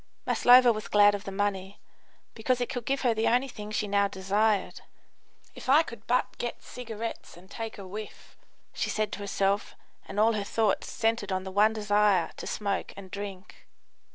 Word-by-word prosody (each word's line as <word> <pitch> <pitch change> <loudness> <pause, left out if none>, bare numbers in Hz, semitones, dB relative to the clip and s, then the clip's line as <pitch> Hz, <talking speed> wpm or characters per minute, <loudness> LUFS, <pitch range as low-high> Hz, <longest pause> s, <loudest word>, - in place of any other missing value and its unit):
Maslova 245 -1 +6
was 215 0 -6
glad 205 0 +5
of 205 0 -5
the 195 - -5
money, 195 -1 -2 0.5
because 245 +3 0
it 245 - -2
could 245 -4 -4
give 275 0 0
her 245 -3 +2
the 220 0 0
only 250 +3 +2
thing 210 -5 -8
she 215 0 -2
now 200 0 +2
desired. 200 +2 0 0.7
"If - - -9
I 295 +5 +6
could 235 -8 -11
but 250 +1 0
get 240 - -4
cigarettes 230 -6 -7
and 185 +2 -17
take 225 -1 -6
a 200 - -8
whiff!" 210 +3 -9 0.4
she - - -2
said 215 -1 -1
to - - -6
herself, 200 0 -1 0.3
and 205 - -4
all 225 +2 +4
her 210 -2 -1
thoughts 215 0 0
centred 225 -3 -1
on 185 0 -1
the 190 - -7
one 210 +3 +4
desire 205 -4 +2
to - - -7
smoke 200 -2 -2
and 190 -2 -10
drink. 200 -2 -8
210 Hz, 185 wpm, -28 LUFS, 200-230 Hz, 0.7 s, Maslova